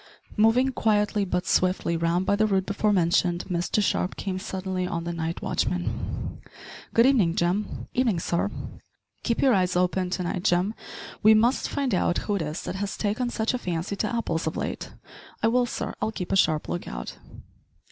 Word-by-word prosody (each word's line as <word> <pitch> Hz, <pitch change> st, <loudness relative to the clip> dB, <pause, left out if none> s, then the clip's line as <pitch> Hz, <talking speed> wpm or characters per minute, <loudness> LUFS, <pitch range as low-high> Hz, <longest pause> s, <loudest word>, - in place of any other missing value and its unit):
Moving 225 Hz, +5 st, +4 dB
quietly 210 Hz, -4 st, +1 dB
but 180 Hz, 0 st, -1 dB
swiftly 180 Hz, -3 st, +1 dB
round 170 Hz, +2 st, +1 dB
by 200 Hz, -, +3 dB
the 215 Hz, +1 st, +2 dB
route 190 Hz, -2 st, +1 dB
before 205 Hz, +1 st, +1 dB
mentioned 175 Hz, -1 st, +2 dB
Mr 175 Hz, +4 st, +1 dB
Sharp 180 Hz, -1 st, 0 dB
came 185 Hz, -1 st, -3 dB
suddenly 185 Hz, -2 st, -3 dB
on 170 Hz, -2 st, -3 dB
the 170 Hz, 0 st, -3 dB
night 165 Hz, 0 st, -3 dB
watchman. 180 Hz, -1 st, -2 dB, 0.5 s
"Good 230 Hz, -, +5 dB
evening, 215 Hz, -11 st, +4 dB
Jim." 180 Hz, +5 st, -1 dB
"Evenin', 245 Hz, -7 st, +2 dB
sir." 170 Hz, +4 st, 0 dB, 0.7 s
"Keep 235 Hz, -, 0 dB
your 265 Hz, -2 st, +5 dB
eyes 185 Hz, -3 st, +2 dB
open 180 Hz, +1 st, +1 dB
to 180 Hz, 0 st, -2 dB
night, 175 Hz, +1 st, -3 dB
Jim. 185 Hz, +2 st, +2 dB, 0.5 s
We 220 Hz, 0 st, +7 dB
must 235 Hz, +4 st, +2 dB
find 275 Hz, -5 st, -1 dB
out 175 Hz, -1 st, +2 dB
who 205 Hz, -, 0 dB
it 200 Hz, -, 0 dB
is 155 Hz, +1 st, -4 dB
that 190 Hz, -, -4 dB
has 200 Hz, 0 st, -3 dB
taken 220 Hz, +4 st, -1 dB
such 225 Hz, -1 st, -1 dB
a 250 Hz, -, -1 dB
fancy 175 Hz, 0 st, -3 dB
to 215 Hz, +3 st, -1 dB
apples 170 Hz, -9 st, -1 dB
of 160 Hz, -, -2 dB
late." -, -, -4 dB, 0.5 s
"I -, -, +5 dB
will, 245 Hz, +1 st, +2 dB
sir; -, -, -4 dB
I'll 220 Hz, -, 0 dB
keep 180 Hz, -5 st, -5 dB
a -, -, +3 dB
sharp 155 Hz, -5 st, +2 dB
look 175 Hz, -, -4 dB
out." -, -, -6 dB
190 Hz, 190 wpm, -26 LUFS, 175-215 Hz, 0.7 s, We